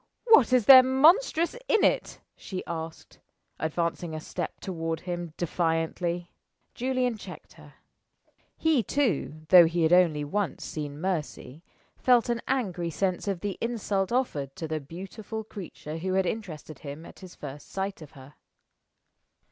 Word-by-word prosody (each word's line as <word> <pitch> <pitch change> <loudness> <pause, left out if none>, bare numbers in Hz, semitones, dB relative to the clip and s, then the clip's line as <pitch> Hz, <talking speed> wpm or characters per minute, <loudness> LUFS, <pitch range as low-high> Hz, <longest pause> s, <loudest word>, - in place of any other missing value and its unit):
"What 285 - +7
is 250 -4 +4
there 260 +1 +11
monstrous 320 - +3
in 440 -4 +3
it?" - - +1
she 185 -2 -6
asked, 165 -1 -7 0.4
advancing 170 +1 -2
a - - -4
step - - -5
toward 165 -4 -4
him, 175 -3 -5
defiantly. 170 +1 -1 0.4
Julian 250 -2 -1
checked - - -11
her. - - -16 0.8
He 320 -5 +3
too 185 - -1
though 175 -2 +9
he 170 0 0
had 160 +2 +4
only 165 -5 +4
once 195 +6 -2
seen 145 -2 -5
Mercy 155 -5 -4 0.4
felt 245 -1 +4
an 235 -1 0
angry 190 -10 -1
sense 185 +3 -2
of 190 -4 -2
the 205 -2 -4
insult 210 -4 -1
offered 150 - -1
to 160 - -5
the 155 0 -2
beautiful 195 +8 -7
creature 175 -7 -8
who 185 +2 -2
had 190 -1 +2
interested 165 -8 -5
him 145 +2 -8
at - - -13
his 185 -2 -12
first 145 0 -9
sight 195 -1 -4
of 155 0 -12
her. 135 0 -14
180 Hz, 150 wpm, -27 LUFS, 160-220 Hz, 0.8 s, there